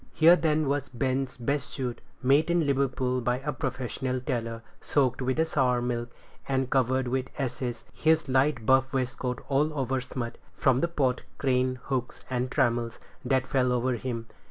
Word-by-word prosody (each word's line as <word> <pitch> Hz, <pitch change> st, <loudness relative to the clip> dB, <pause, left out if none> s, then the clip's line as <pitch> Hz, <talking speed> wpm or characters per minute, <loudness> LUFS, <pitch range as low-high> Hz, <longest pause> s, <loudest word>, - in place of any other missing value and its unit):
Here, 165 Hz, +2 st, +8 dB
then, 155 Hz, -3 st, +1 dB
was 140 Hz, 0 st, -1 dB
Ben's 130 Hz, +1 st, -1 dB
best 140 Hz, +3 st, -1 dB
suit, 125 Hz, -4 st, -4 dB, 0.2 s
made 140 Hz, +5 st, +4 dB
in 170 Hz, -2 st, +3 dB
Liverpool 130 Hz, -2 st, +1 dB
by 125 Hz, +1 st, +1 dB
a 150 Hz, +1 st, -2 dB
professional 130 Hz, 0 st, -2 dB
tailor, 115 Hz, -2 st, -3 dB, 0.2 s
soaked 130 Hz, -3 st, +1 dB
with 130 Hz, +6 st, +1 dB
sour 125 Hz, -5 st, +2 dB
milk, 120 Hz, -1 st, -2 dB, 0.4 s
and 130 Hz, -1 st, 0 dB
covered 130 Hz, 0 st, +2 dB
with 130 Hz, +1 st, -1 dB
ashes; 125 Hz, -2 st, -3 dB
his 160 Hz, 0 st, +2 dB
light 130 Hz, -2 st, +2 dB
buff 130 Hz, +2 st, +4 dB
waistcoat 125 Hz, -1 st, -2 dB
all 145 Hz, +3 st, +2 dB
over 130 Hz, -1 st, 0 dB
smut, 120 Hz, -2 st, -5 dB, 0.2 s
from 130 Hz, -1 st, +3 dB
the 170 Hz, -, +2 dB
pot, 135 Hz, -7 st, 0 dB, 0.2 s
crane, 130 Hz, -1 st, +1 dB
hooks, 130 Hz, -2 st, -3 dB
and 125 Hz, 0 st, 0 dB
trammels, 120 Hz, -2 st, 0 dB, 0.2 s
that 130 Hz, -1 st, +1 dB
fell 125 Hz, -2 st, +1 dB
over 125 Hz, +1 st, +1 dB
him. 120 Hz, -1 st, -4 dB
130 Hz, 160 wpm, -28 LUFS, 125-135 Hz, 0.4 s, Here